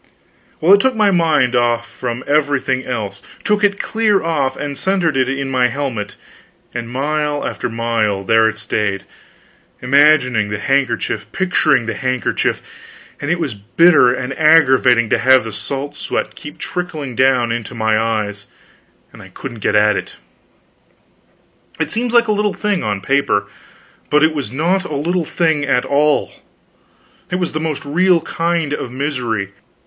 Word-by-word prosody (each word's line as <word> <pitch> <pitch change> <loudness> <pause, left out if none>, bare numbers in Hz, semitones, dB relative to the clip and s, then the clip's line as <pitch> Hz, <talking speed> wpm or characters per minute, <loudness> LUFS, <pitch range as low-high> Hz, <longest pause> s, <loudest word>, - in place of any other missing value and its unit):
Well, 175 +5 +5
it 200 - +7
took 260 +1 +1
my 210 -2 +3
mind 155 -8 +2
off 120 -1 +1
from 125 0 -5
everything 140 -3 0
else; 105 -5 -4 0.2
took 210 0 0
it 200 -1 +2
clear 215 -3 +1
off, 150 -5 -1
and 145 -1 -4
centered 175 -2 0
it 130 -1 +1
in 135 0 -2
my 125 -1 +3
helmet; 125 -5 -4 0.6
and 120 -1 -5
mile 145 +3 -2
after 120 - -4
mile, 115 -4 -1
there 110 +2 +3
it 110 - -7
stayed, 105 -3 -2 0.8
imagining 125 -4 +3
the 105 - -3
handkerchief, 135 +3 -1
picturing 180 -9 +1
the 115 - -2
handkerchief; 130 -1 -1 0.6
and 145 - -3
it 175 +1 0
was 150 -8 -2
bitter 125 - +4
and 130 +1 -3
aggravating 130 -7 +5
to - - +3
have 130 +1 +5
the 110 - -6
salt 140 +6 -5
sweat - - -3
keep 150 +2 -11
trickling 155 -8 -5
down 130 -2 +2
into 120 0 -5
my 110 -1 +1
eyes, 105 -2 -2 0.7
and - - -13
I - - -12
couldn't 120 -4 -9
get 105 - 0
at 105 0 +4
it. - - -5 1.6
It - - -2
seems 240 +2 -1
like 235 -1 +4
a - - +1
little 210 -1 0
thing, 210 -3 -1
on 105 -2 -2
paper, 120 -4 +1 0.6
but 150 +1 +3
it 160 0 +3
was 140 -8 -4
not 175 +8 0
a 155 - -5
little 170 +4 -1
thing 160 -2 0
at 125 -3 +1
all; 145 +1 +1 1.0
it - - -2
was 180 -2 -1
the 155 - -3
most 155 -2 -3
real 180 +4 +3
kind 165 -3 -1
of 130 - -4
misery. 125 -7 -3
135 Hz, 160 wpm, -17 LUFS, 120-160 Hz, 1.6 s, it